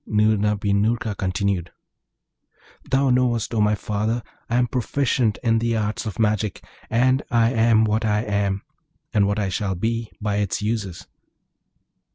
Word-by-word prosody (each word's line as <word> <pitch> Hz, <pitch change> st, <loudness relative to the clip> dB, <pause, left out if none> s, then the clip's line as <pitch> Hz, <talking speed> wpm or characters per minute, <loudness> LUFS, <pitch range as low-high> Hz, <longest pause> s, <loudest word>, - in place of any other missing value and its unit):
Noorna 105 Hz, -1 st, +2 dB
bin 100 Hz, 0 st, +1 dB
Noorka 110 Hz, 0 st, 0 dB
continued, 95 Hz, -1 st, -1 dB, 1.2 s
'Thou 135 Hz, 0 st, +3 dB
knowest, 120 Hz, -3 st, +1 dB
O 110 Hz, -, +2 dB
my 105 Hz, 0 st, +3 dB
father, 105 Hz, +3 st, -2 dB, 0.3 s
I 120 Hz, -, 0 dB
am 125 Hz, 0 st, +3 dB
proficient 125 Hz, -2 st, 0 dB
in 115 Hz, -1 st, +3 dB
the 115 Hz, 0 st, 0 dB
arts 105 Hz, +1 st, -2 dB
of 100 Hz, -4 st, -5 dB
magic, 105 Hz, -2 st, 0 dB, 0.3 s
and 130 Hz, +4 st, +3 dB
I 115 Hz, -1 st, +3 dB
am 115 Hz, -2 st, +4 dB
what 110 Hz, +1 st, 0 dB
I 105 Hz, -1 st, +1 dB
am, 100 Hz, -3 st, -1 dB, 0.5 s
and 100 Hz, -2 st, +3 dB
what 100 Hz, +1 st, 0 dB
I 100 Hz, -2 st, 0 dB
shall 95 Hz, 0 st, -2 dB
be, 115 Hz, +4 st, -2 dB
by 105 Hz, -1 st, -1 dB
its 100 Hz, -2 st, -1 dB
uses. 105 Hz, -4 st, -3 dB
110 Hz, 155 wpm, -23 LUFS, 100-115 Hz, 1.2 s, am